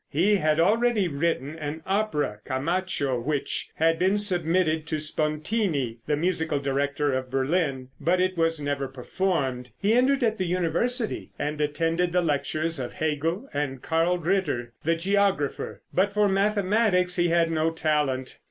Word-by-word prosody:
He 195 +8 +3
had 155 -2 +1
already 215 +2 +3
written 150 -1 -1
an 155 +1 -5
opera 190 - 0
"Camacho," 145 -2 -1
which 140 +3 -2
had 165 +1 +2
been 190 +3 +3
submitted 175 -5 +1
to 155 -1 -1
Spontini, 155 - -1
the 150 -1 +1
musical 160 -2 0
director 140 +1 0
of 130 0 -2
Berlin, 135 -1 0
but 180 +2 +2
it 185 0 +1
was 165 -1 +1
never 145 -1 -2
performed. 130 -2 -2
He 205 +2 +2
entered 260 +2 +3
at 220 -2 +1
the 185 - 0
University 185 +8 -1
and 150 +1 -2
attended 165 +4 0
the 180 - +3
lectures 155 +1 -1
of 125 -2 -4
Hegel 165 - -1
and 135 -3 -3
Carl 165 +2 +1
Ritter, 160 -9 -1
the 165 +2 +2
geographer, 195 -4 0
but 195 +2 +2
for 210 0 +4
mathematics 195 -1 +2
he 175 0 +3
had 165 -1 +2
no 160 0 +1
talent. 150 -5 -1
165 Hz, 150 wpm, -26 LUFS, 145-185 Hz, -, for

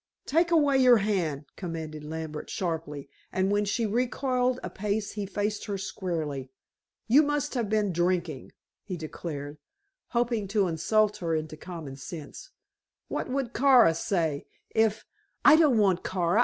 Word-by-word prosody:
"Take 335 +4 +2
away 290 -5 +4
your 250 -2 +7
hand," 175 -9 -1
commanded 160 -4 -6
Lambert 155 0 -6
sharply, 160 -5 -3 0.2
and 190 +1 +1
when 205 0 +2
she 225 +3 0
recoiled 250 +2 0
a - - -3
pace 205 +1 -2
he 205 -2 -4
faced 205 +1 -2
her 205 -2 -3
squarely. 160 -8 -4 0.6
"You 260 +7 +6
must 295 0 -1
have 235 -6 -1
been 210 -3 +1
drinking," 175 -4 -1 0.3
he 185 -4 -5
declared, 150 -2 -6 0.5
hoping 235 -4 0
to 200 -1 +2
insult 210 +6 +2
her 165 -4 -1
into 155 0 -3
common 160 -5 -8
sense. 155 - -9 0.6
"What - - -3
would 255 -2 -2
Kara 250 -9 +6
say 160 -4 -1 0.2
if 220 -1 +1 0.2
" - - -42
"I 295 - +9
don't 305 -7 +4
want 195 -4 +3
Kara. 180 +2 +1
195 Hz, 150 wpm, -28 LUFS, 160-235 Hz, 0.6 s, I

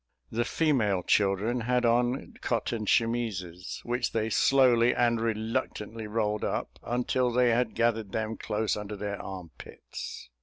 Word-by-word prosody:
The 120 +1 0
female 115 - +1
children 105 +6 +2
had 125 +1 +1
on 120 +3 +1
cotton 115 -2 -1
chemises, 105 -8 -1
which 120 +1 -1
they 110 0 0
slowly 125 -1 +4
and 120 -2 +2
reluctantly 110 -1 -2
rolled 105 -1 -1
up, - - -3
until 125 +1 0
they 125 0 +4
had 120 0 +1
gathered 115 -3 +1
them 110 0 -2
close 110 0 -1
under 105 0 -5
their 100 0 -4
armpits. 90 -8 -9
115 Hz, 130 wpm, -28 LUFS, 105-120 Hz, -, slowly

